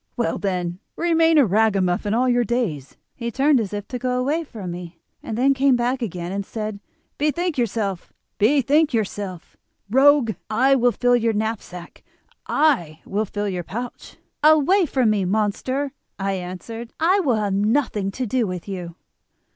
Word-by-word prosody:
Well, 235 Hz, -, -1 dB
then, 180 Hz, -2 st, -2 dB, 0.2 s
remain 330 Hz, -1 st, +3 dB
a 285 Hz, -, +6 dB
ragamuffin 200 Hz, -2 st, +1 dB
all 250 Hz, +2 st, +2 dB
your 245 Hz, -1 st, +3 dB
days.' 200 Hz, -, -2 dB, 0.2 s
"He 235 Hz, -1 st, -4 dB
turned 275 Hz, +3 st, +3 dB
as 210 Hz, -4 st, -3 dB
if 205 Hz, -1 st, -5 dB
to 250 Hz, -, -4 dB
go 250 Hz, 0 st, -1 dB
away 295 Hz, +6 st, 0 dB
from 210 Hz, -, -7 dB
me, 175 Hz, -1 st, -8 dB, 0.2 s
then 250 Hz, +5 st, +1 dB
came 270 Hz, -1 st, +3 dB
back 245 Hz, +2 st, 0 dB
again 180 Hz, -5 st, -4 dB
and 200 Hz, +1 st, -2 dB
said: 215 Hz, 0 st, -5 dB, 0.4 s
'Bethink 325 Hz, +3 st, 0 dB
yourself, 210 Hz, -6 st, -2 dB, 0.3 s
bethink 280 Hz, +5 st, +3 dB
yourself, 200 Hz, -5 st, -4 dB, 0.4 s
rogue. 270 Hz, -1 st, +5 dB, 0.2 s
I 255 Hz, +5 st, +3 dB
will 245 Hz, -2 st, +3 dB
fill 245 Hz, +1 st, +2 dB
your 230 Hz, -1 st, +1 dB
knapsack—I 210 Hz, -, -2 dB
will 210 Hz, +3 st, -1 dB
fill 205 Hz, +1 st, -3 dB
your 180 Hz, -3 st, -3 dB
pouch.' 240 Hz, +8 st, -7 dB, 0.2 s
"'Away 315 Hz, +5 st, +5 dB
from 255 Hz, -5 st, +2 dB
me, 205 Hz, -2 st, +1 dB
monster,' 220 Hz, +8 st, -1 dB, 0.3 s
I 195 Hz, 0 st, -1 dB
answered, 195 Hz, +6 st, -6 dB
'I 360 Hz, +5 st, +3 dB
will 275 Hz, -11 st, +2 dB
have 205 Hz, -2 st, -1 dB
nothing 210 Hz, -1 st, +1 dB
to 255 Hz, +6 st, -3 dB
do 240 Hz, 0 st, 0 dB
with 180 Hz, 0 st, -6 dB
you. 180 Hz, -4 st, -6 dB
225 Hz, 155 wpm, -22 LUFS, 195-265 Hz, 0.4 s, a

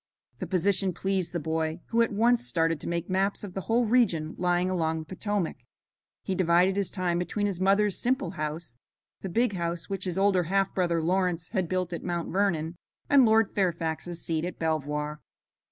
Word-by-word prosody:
The -, -, -4 dB
position 190 Hz, 0 st, +1 dB
pleased 190 Hz, -3 st, -1 dB
the 175 Hz, -, -2 dB
boy, 160 Hz, +1 st, -2 dB
who 230 Hz, 0 st, +3 dB
at 230 Hz, -, +2 dB
once 235 Hz, +3 st, +3 dB
started 165 Hz, -6 st, +1 dB
to -, -, -4 dB
make 170 Hz, 0 st, -2 dB
maps 195 Hz, +2 st, 0 dB
of 195 Hz, -3 st, -7 dB
the 190 Hz, -, -3 dB
whole 235 Hz, +4 st, +1 dB
region 195 Hz, -10 st, +2 dB
lying 180 Hz, 0 st, +2 dB
along 165 Hz, -3 st, 0 dB
the 160 Hz, -, -6 dB
Potomac. 190 Hz, 0 st, -2 dB, 0.7 s
He 190 Hz, -, -2 dB
divided 180 Hz, +1 st, +3 dB
his 200 Hz, -3 st, 0 dB
time 180 Hz, -3 st, -1 dB
between 205 Hz, +4 st, -1 dB
his 195 Hz, -4 st, -2 dB
mother's 200 Hz, +1 st, +2 dB
simple 260 Hz, +3 st, 0 dB
house, 155 Hz, -6 st, -5 dB, 0.4 s
the 190 Hz, -, -4 dB
big 230 Hz, +4 st, +1 dB
house 170 Hz, -2 st, -3 dB
which 195 Hz, -, -2 dB
his 180 Hz, -1 st, -2 dB
older 195 Hz, -3 st, +3 dB
half 195 Hz, +3 st, +1 dB
brother, 170 Hz, -3 st, +1 dB
Lawrence, 180 Hz, -1 st, 0 dB
had 190 Hz, -6 st, -1 dB
built 185 Hz, -2 st, -1 dB
at 170 Hz, -, -4 dB
Mount 175 Hz, -2 st, -3 dB
Vernon, 175 Hz, -4 st, 0 dB, 0.3 s
and 270 Hz, -4 st, +7 dB
Lord 220 Hz, -1 st, +3 dB
Fairfax's 170 Hz, -2 st, -2 dB
seat 160 Hz, -1 st, -1 dB
at 175 Hz, -1 st, -4 dB
Belvoir. 150 Hz, -1 st, -2 dB
180 Hz, 185 wpm, -27 LUFS, 165-195 Hz, 0.7 s, and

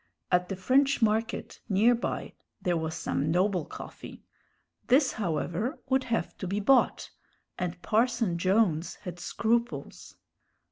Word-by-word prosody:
At 180 Hz, 0 st, +2 dB
the 195 Hz, -, -2 dB
French 275 Hz, +8 st, +3 dB
Market, 220 Hz, +1 st, 0 dB
near 215 Hz, +5 st, +5 dB
by, 240 Hz, -, -3 dB, 0.3 s
there 175 Hz, -1 st, 0 dB
was 160 Hz, -1 st, -2 dB
some 145 Hz, +3 st, -1 dB
noble 180 Hz, -1 st, +1 dB
coffee. -, -, -10 dB, 0.6 s
This, 260 Hz, +2 st, +4 dB
however, 185 Hz, -, -2 dB
would 265 Hz, 0 st, +2 dB
have 230 Hz, -2 st, -2 dB
to 185 Hz, -, -4 dB
be 200 Hz, +3 st, -1 dB
bought, 250 Hz, +5 st, +3 dB, 0.5 s
and 180 Hz, -1 st, -3 dB
Parson 225 Hz, -5 st, +1 dB
Jones 185 Hz, -3 st, +2 dB
had 175 Hz, -1 st, -8 dB
scruples. 235 Hz, +5 st, -2 dB
205 Hz, 130 wpm, -28 LUFS, 180-235 Hz, 0.6 s, near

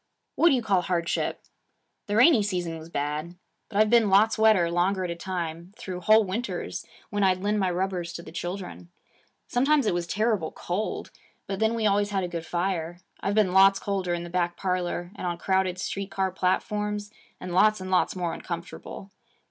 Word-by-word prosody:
'What 340 Hz, -, +5 dB
do 275 Hz, -, +4 dB
you 245 Hz, -, -1 dB
call 195 Hz, -4 st, +2 dB
hardship? 175 Hz, -1 st, -1 dB, 0.6 s
The 205 Hz, -, -1 dB
rainy 250 Hz, +4 st, +6 dB
reason 180 Hz, -5 st, -2 dB
was 160 Hz, +1 st, -11 dB
bad. 150 Hz, +3 st, -3 dB, 0.3 s
But 205 Hz, -, -4 dB
I've 215 Hz, +1 st, +4 dB
been 230 Hz, -3 st, +5 dB
lots 210 Hz, +3 st, +5 dB
wetter 215 Hz, -6 st, +4 dB
longer 185 Hz, +2 st, +1 dB
at 175 Hz, -, -2 dB
a -, -, -4 dB
time, 170 Hz, 0 st, -5 dB
through 180 Hz, -2 st, -6 dB
whole 215 Hz, +4 st, +6 dB
winters, 215 Hz, +6 st, -4 dB, 0.2 s
when 205 Hz, -1 st, -1 dB
I'd 185 Hz, -1 st, +2 dB
lend 210 Hz, +1 st, +1 dB
my 190 Hz, -2 st, +1 dB
rubbers 180 Hz, -1 st, -2 dB
to 170 Hz, -, -7 dB
the 160 Hz, -, -11 dB
children. 175 Hz, +1 st, -6 dB, 0.6 s
Sometimes 275 Hz, +2 st, +2 dB
it 210 Hz, -, +2 dB
was 175 Hz, -1 st, -2 dB
terrible 210 Hz, -4 st, 0 dB
cold. 190 Hz, +5 st, -3 dB, 0.3 s
But 195 Hz, -1 st, -4 dB
then 220 Hz, +1 st, +2 dB
we 225 Hz, -1 st, -1 dB
always 205 Hz, 0 st, +2 dB
had 195 Hz, -2 st, -1 dB
a -, -, -1 dB
good 170 Hz, -1 st, -6 dB
fire. 175 Hz, -1 st, -2 dB, 0.2 s
I've 200 Hz, -, -1 dB
been 205 Hz, -4 st, +3 dB
lots 195 Hz, +1 st, +6 dB
colder 190 Hz, -3 st, -1 dB
in 170 Hz, -, -4 dB
the 175 Hz, -, -8 dB
back 175 Hz, -1 st, 0 dB
parlor 180 Hz, -1 st, -2 dB
and 185 Hz, -, -4 dB
on 175 Hz, -1 st, -2 dB
crowded 190 Hz, 0 st, 0 dB
street 195 Hz, +1 st, -4 dB
car 190 Hz, -1 st, -1 dB
platforms, 210 Hz, +3 st, -1 dB, 0.3 s
and 180 Hz, -, -6 dB
lots 215 Hz, +3 st, +4 dB
and 185 Hz, 0 st, -6 dB
lots 185 Hz, -, +2 dB
more 175 Hz, -2 st, -2 dB
uncomfortable. 175 Hz, +3 st, -7 dB
190 Hz, 195 wpm, -26 LUFS, 175-205 Hz, 0.6 s, rainy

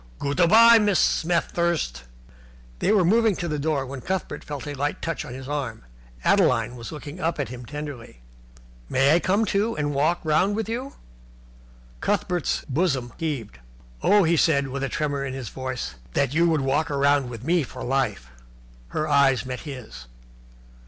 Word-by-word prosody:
Goot 140 Hz, +4 st, -3 dB
a 175 Hz, -, +6 dB
bye, 230 Hz, +4 st, +8 dB
Mrs. 205 Hz, -3 st, +2 dB
Smet 170 Hz, +1 st, +1 dB
thirst." 170 Hz, -, -1 dB, 0.7 s
They -, -, +2 dB
were 200 Hz, -5 st, +4 dB
moving 220 Hz, +2 st, +3 dB
to 175 Hz, -, -3 dB
the 150 Hz, -2 st, -2 dB
door, 145 Hz, -2 st, 0 dB
when 135 Hz, 0 st, -7 dB
Cuthbert 190 Hz, +5 st, -3 dB
felt 145 Hz, -4 st, -6 dB
a 145 Hz, -, -4 dB
light 145 Hz, +1 st, -2 dB
touch 165 Hz, -2 st, -3 dB
on 125 Hz, -, -8 dB
his 130 Hz, 0 st, -8 dB
arm. 140 Hz, -, -4 dB, 0.4 s
Adeline 115 Hz, +2 st, +3 dB
was 120 Hz, +3 st, -8 dB
looking 150 Hz, +2 st, -8 dB
up 165 Hz, -1 st, -1 dB
at 140 Hz, -, -2 dB
him 125 Hz, -1 st, -9 dB
tenderly. 145 Hz, -, -8 dB, 0.7 s
"May 135 Hz, +3 st, +4 dB
I 170 Hz, -, +5 dB
come, 200 Hz, +5 st, +1 dB
too, 215 Hz, +3 st, 0 dB
and 145 Hz, -1 st, -1 dB
walk 155 Hz, +5 st, +1 dB
round 180 Hz, +6 st, +2 dB
with 220 Hz, -1 st, -2 dB
you?" 250 Hz, +5 st, -4 dB, 1.1 s
Cuthbert's 175 Hz, -, -1 dB
bosom 135 Hz, -5 st, 0 dB
heaved. 135 Hz, -, -4 dB, 0.4 s
"Oh," 205 Hz, 0 st, +5 dB
he 165 Hz, 0 st, +2 dB
said, 140 Hz, -4 st, +2 dB
with 135 Hz, +1 st, -4 dB
a 135 Hz, -, -1 dB
tremor 145 Hz, -2 st, -2 dB
in 135 Hz, -1 st, -4 dB
his 130 Hz, -4 st, -6 dB
voice, 130 Hz, -, -5 dB, 0.2 s
"that 140 Hz, -1 st, +1 dB
you 170 Hz, +2 st, +3 dB
would 160 Hz, -3 st, +1 dB
walk 145 Hz, +4 st, 0 dB
round 140 Hz, -2 st, +2 dB
with 120 Hz, -1 st, -8 dB
me 170 Hz, +4 st, +2 dB
for 130 Hz, -2 st, -7 dB
life!" 130 Hz, -, -1 dB, 0.6 s
Her 155 Hz, -, -2 dB
eyes 140 Hz, -3 st, +3 dB
met 130 Hz, 0 st, -5 dB
his. 125 Hz, -, -9 dB
145 Hz, 180 wpm, -24 LUFS, 130-170 Hz, 1.1 s, bye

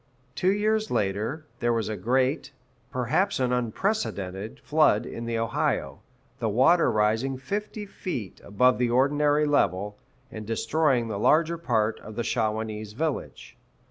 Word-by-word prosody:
Two 185 Hz, +7 st, +2 dB
years 215 Hz, +1 st, +1 dB
later, 105 Hz, +10 st, -1 dB
there 120 Hz, 0 st, +1 dB
was 115 Hz, -1 st, 0 dB
a 110 Hz, -, -3 dB
great 130 Hz, +7 st, 0 dB, 0.4 s
perhaps 130 Hz, -, 0 dB
an 125 Hz, -1 st, +1 dB
unprecedented 110 Hz, -, -2 dB
flood 150 Hz, -8 st, +3 dB
in 115 Hz, -, -6 dB
the 115 Hz, 0 st, -2 dB
Ohio, 115 Hz, -1 st, -1 dB, 0.4 s
the 110 Hz, -, 0 dB
water 135 Hz, +11 st, +4 dB
rising 110 Hz, +5 st, +1 dB
fifty 210 Hz, +7 st, -4 dB
feet 130 Hz, -, -6 dB
above 125 Hz, +6 st, +2 dB
the 125 Hz, -1 st, +2 dB
ordinary 145 Hz, +4 st, +3 dB
level, 105 Hz, -8 st, 0 dB, 0.3 s
and 110 Hz, -1 st, -8 dB
destroying 120 Hz, +2 st, +1 dB
the 105 Hz, -3 st, -4 dB
larger 165 Hz, +7 st, +3 dB
part 115 Hz, -8 st, 0 dB
of 110 Hz, -, -10 dB
the 120 Hz, -, -2 dB
Shawanese 110 Hz, -2 st, -2 dB
village. 155 Hz, +1 st, -4 dB
125 Hz, 140 wpm, -26 LUFS, 110-155 Hz, 0.4 s, water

